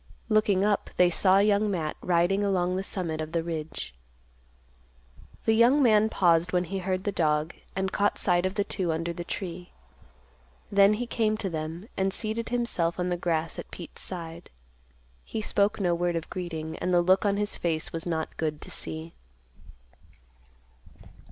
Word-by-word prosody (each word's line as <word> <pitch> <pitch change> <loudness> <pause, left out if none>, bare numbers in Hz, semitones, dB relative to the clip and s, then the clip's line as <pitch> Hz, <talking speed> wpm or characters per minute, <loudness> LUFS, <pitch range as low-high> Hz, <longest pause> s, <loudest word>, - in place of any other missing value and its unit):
Looking 210 -3 +3
up, 205 -1 +1
they 180 -1 +5
saw 190 +2 +4
Young 205 +1 +3
Matt 165 -6 -2
riding 180 +3 +2
along 185 -2 +1
the 190 - -1
summit 170 -5 -3
of 155 +1 -6
the 165 -1 0
ridge. 160 - -5 1.5
The 225 - +4
young 245 +6 +5
man 220 -2 +5
paused 175 -3 +3
when 180 -1 +2
he 190 +2 -4
heard 185 0 -2
the 205 - 0
dog, 155 -3 +1 0.2
and 190 0 -1
caught 205 +1 +1
sight 180 -1 +2
of 185 - -6
the 205 - +1
two 185 -4 -2
under 165 +2 -2
the 175 - -5
tree; 180 0 -6 1.0
then 200 +1 +6
he 245 +3 -3
came 220 -2 0
to 195 -4 -3
them, 160 +5 -5
and 190 0 +1
seated 220 +3 -2
himself 220 -9 0
on 180 0 0
the 175 - +1
grass 165 -2 -1
at - - -8
Pete's 175 - -9
side. 170 -2 -6 0.7
He - - -5
spoke 205 -1 +1
no 180 -3 +2
word 175 0 0
of 165 -1 -4
greeting, 160 -3 -5
and 180 - -1
the 175 -1 +4
look 185 +2 +4
on 200 -1 +1
his 210 0 -1
face 160 -2 -2
was 165 +1 -4
not 160 -2 -3
good 155 -2 -2
to - - -8
see. 160 +1 -3
180 Hz, 175 wpm, -27 LUFS, 165-200 Hz, 1.5 s, then